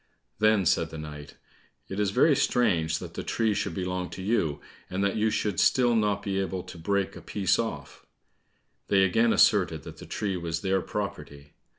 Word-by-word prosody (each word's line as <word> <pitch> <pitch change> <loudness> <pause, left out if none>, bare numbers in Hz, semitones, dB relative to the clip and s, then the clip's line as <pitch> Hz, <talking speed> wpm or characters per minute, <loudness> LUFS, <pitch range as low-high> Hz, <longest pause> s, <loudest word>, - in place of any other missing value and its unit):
Then 110 -3 +3
said 80 -1 +2
the 80 - -8
knight, 75 -1 -9 0.5
"It 95 - -5
is 105 -1 +2
very 135 +8 +4
strange 85 -13 +1
that - - -8
the - - -4
tree 110 -2 0
should - - -2
belong 90 -1 -3
to 95 - -8
you, 85 -9 0 0.3
and 95 +2 -2
that 100 - +1
you 110 0 +2
should 105 -4 -1
still 120 -2 +4
not 105 -2 +1
be 95 -1 -1
able 95 -1 -3
to - - -11
break 100 +3 -1
a - - -9
piece 95 -4 0
off." 75 -12 -5 0.8
They 95 -1 +4
again 115 +5 +3
asserted - - +3
that - - -10
the - - -11
tree 100 -3 -2
was 85 -2 -3
their 95 0 +1
property. 75 -9 -6
95 Hz, 190 wpm, -27 LUFS, 85-105 Hz, 0.8 s, very